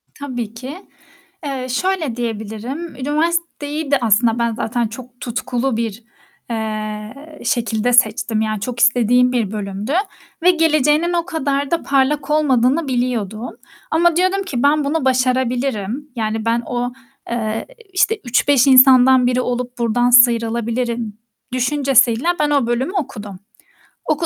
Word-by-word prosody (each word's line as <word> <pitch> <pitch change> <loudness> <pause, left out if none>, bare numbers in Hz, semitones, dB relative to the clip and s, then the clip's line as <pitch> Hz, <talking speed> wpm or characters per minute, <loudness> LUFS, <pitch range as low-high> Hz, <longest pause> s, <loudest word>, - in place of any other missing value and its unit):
Tabii 245 -6 -5
ki. 265 - -9 0.6
Eee, 265 -2 -4
şöyle 320 -2 -1
diyebilirim, 235 +7 -5
üniversiteyi 305 +1 -2
de 280 - +5
aslında 225 +1 +2
ben 235 -1 0
zaten 230 +1 -1
çok 245 +2 -11
tutkulu 245 0 -2
bir, 225 -1 -4 0.5
eee, 220 +6 -5
şekilde 235 0 0
seçtim, 220 -1 +2
yani 215 -2 -2
çok 240 +2 -4
istediğim 245 +1 +4
bir 225 -5 -1
bölümdü 205 +3 -4 0.5
ve 360 - +7
geleceğinin 315 0 +2
o 340 -1 0
kadar 280 -4 -2
da 335 - 0
parlak 275 +2 +1
olmadığını 285 0 +2
biliyordum 240 -3 -2 0.4
ama 335 +1 +3
diyordum 370 +2 +1
ki, 270 -11 -3
"Ben 295 +1 +3
bunu 285 0 -1
başarabilirim." 255 0 -1
yani, 220 0 -2
ben 230 +1 +1
o, 245 0 -3 0.4
eee, 225 -2 -2 0.3
işte 415 +3 +2
3-5 260 +2 +3
insandan 260 -1 +6
biri 250 0 +1
olup 250 0 -3
buradan 240 +1 +1
sıyrılabilirim 235 -2 +2 0.4
düşüncesiyle 255 -1 +2
ben 300 - +2
o 280 -5 +2
bölümü 255 +9 -1
okudum. 210 - -5 0.7
Oku 310 +2 0
250 Hz, 130 wpm, -18 LUFS, 230-285 Hz, 0.7 s, ve